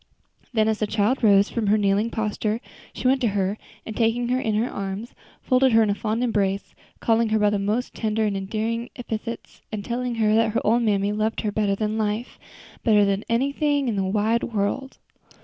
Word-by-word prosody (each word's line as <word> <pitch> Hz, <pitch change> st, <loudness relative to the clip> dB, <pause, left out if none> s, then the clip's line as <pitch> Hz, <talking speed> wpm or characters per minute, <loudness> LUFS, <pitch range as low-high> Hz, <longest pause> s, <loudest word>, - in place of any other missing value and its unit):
Then 220 Hz, -3 st, +2 dB
as 220 Hz, -1 st, 0 dB
the 215 Hz, -, 0 dB
child 220 Hz, +5 st, 0 dB
rose 200 Hz, -1 st, +5 dB
from 225 Hz, -3 st, -1 dB
her 210 Hz, +2 st, +4 dB
kneeling 205 Hz, +2 st, +2 dB
posture 215 Hz, 0 st, -2 dB, 0.3 s
she -, -, -2 dB
went 265 Hz, +1 st, +3 dB
to 240 Hz, -, +2 dB
her, 195 Hz, +2 st, 0 dB, 0.3 s
and 220 Hz, -, -6 dB
taking 235 Hz, +1 st, +1 dB
her 255 Hz, +1 st, +1 dB
in 220 Hz, -4 st, -1 dB
her 225 Hz, +3 st, +1 dB
arms, 200 Hz, +3 st, -5 dB, 0.3 s
folded 255 Hz, -1 st, +3 dB
her 225 Hz, 0 st, +6 dB
in 210 Hz, -, +1 dB
a -, -, +2 dB
fond 220 Hz, +3 st, -2 dB
embrace, 200 Hz, -4 st, -1 dB, 0.3 s
calling 225 Hz, 0 st, +2 dB
her 220 Hz, -, +2 dB
by 210 Hz, -1 st, +3 dB
the 205 Hz, -, 0 dB
most 210 Hz, +5 st, -1 dB
tender 220 Hz, 0 st, 0 dB
and 205 Hz, -2 st, 0 dB
endearing 220 Hz, +4 st, -2 dB
epithets, 230 Hz, -1 st, -6 dB
and 210 Hz, -2 st, -4 dB
telling 245 Hz, 0 st, -2 dB
her 215 Hz, -2 st, +2 dB
that 225 Hz, -1 st, +3 dB
her 230 Hz, -, +1 dB
old 230 Hz, +3 st, +3 dB
mammy 205 Hz, -2 st, +1 dB
loved 215 Hz, +1 st, -1 dB
her 210 Hz, -, -1 dB
better 205 Hz, -1 st, +1 dB
than 215 Hz, +1 st, -2 dB
life 215 Hz, +3 st, -2 dB, 0.4 s
better 210 Hz, -3 st, +5 dB
than 200 Hz, +1 st, 0 dB
anything 280 Hz, +3 st, +1 dB
in 230 Hz, -, 0 dB
the 195 Hz, -, 0 dB
wide 215 Hz, +4 st, +1 dB
world. 230 Hz, +5 st, -2 dB
220 Hz, 205 wpm, -24 LUFS, 205-235 Hz, 0.4 s, her